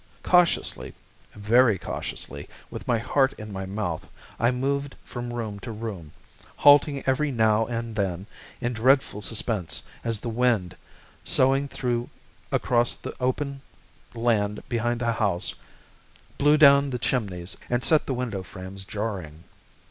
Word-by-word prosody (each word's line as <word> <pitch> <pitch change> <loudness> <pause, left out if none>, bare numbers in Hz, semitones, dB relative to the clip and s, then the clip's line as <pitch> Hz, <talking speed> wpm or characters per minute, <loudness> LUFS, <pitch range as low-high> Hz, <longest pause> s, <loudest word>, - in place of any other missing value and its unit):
Cautiously, 175 -2 +2 0.4
very 110 +1 +4
cautiously, 70 -4 -5 0.2
with - - -8
my 120 - +3
heart 130 +4 +2
in 105 -1 -9
my 95 0 -4
mouth, 95 -5 -4 0.3
I 120 - +3
moved 140 +2 -1
from 120 -1 -6
room 110 -4 -4
to 115 - -7
room, 105 -8 -6 0.4
halting 145 -1 +5
every 135 +3 +1
now 110 -2 +3
and 115 -1 -4
then 95 -3 -2 0.3
in 120 -1 -2
dreadful 125 -2 +2
suspense 105 -2 -1 0.2
as 115 -2 0
the 120 - -6
wind, 115 -6 +1 0.5
soughing 135 +2 +4
through 120 -3 -2 0.4
across 120 -1 +2
the - - -7
open 135 +2 -1 0.5
land 110 -3 0
behind 120 0 -1
the 120 -1 +1
house, 100 -5 0 0.9
blew 150 +1 +5
down 140 -1 +7
the 125 - -2
chimneys 100 -7 -2
and 120 0 0
set 155 -2 +3
the 130 - -1
window 120 -6 -3
frames 95 +1 -8
jarring. 95 -8 -5
115 Hz, 135 wpm, -25 LUFS, 100-130 Hz, 0.9 s, down